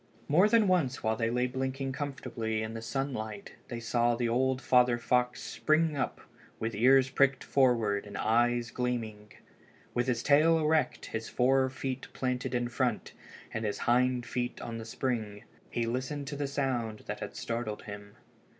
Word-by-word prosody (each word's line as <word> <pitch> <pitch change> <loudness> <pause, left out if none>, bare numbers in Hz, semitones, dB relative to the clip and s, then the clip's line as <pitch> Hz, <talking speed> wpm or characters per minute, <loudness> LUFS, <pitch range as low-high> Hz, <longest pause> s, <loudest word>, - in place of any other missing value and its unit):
More 180 +8 +5
than 225 -2 +4
once 160 -9 +1
while 110 0 +1
they 115 0 0
lay 125 +1 +1
blinking 130 +1 -2
comfortably 120 -6 -3
in 110 0 -5
the 115 - -5
sunlight 115 -5 -4
they 120 - -5
saw 120 +1 +1
the 120 0 0
old 130 +2 +1
father 125 -1 +4
fox 125 +1 0
spring 155 0 +1
up 135 - -2 0.4
with 110 +1 -2
his 105 - -4
ears 135 +1 +6
pricked 140 -1 +3
forward 115 -7 +2
and 100 -1 -7
his - - -3
eyes 120 +2 +2
gleaming. 110 -4 -3 0.6
With 120 +1 0
his 120 -2 0
tail 155 +3 +5
erect, 155 0 +1
his 110 0 -3
fore 130 +1 +3
feet 130 0 -4
planted 125 0 -2
in 120 0 0
front, 120 -2 -1 0.4
and 115 - -2
his 105 -2 -1
hind 125 0 +2
feet 120 0 -3
on 115 -1 -5
the 110 - -7
spring, 110 -4 -3 0.3
he 120 - -1
listened 130 +5 -3
to 145 - -5
the 145 0 -2
sound 125 -6 -2
that - - -5
had - - -6
startled 115 -2 -4
him. 100 -1 -9
125 Hz, 175 wpm, -30 LUFS, 115-135 Hz, 0.6 s, ears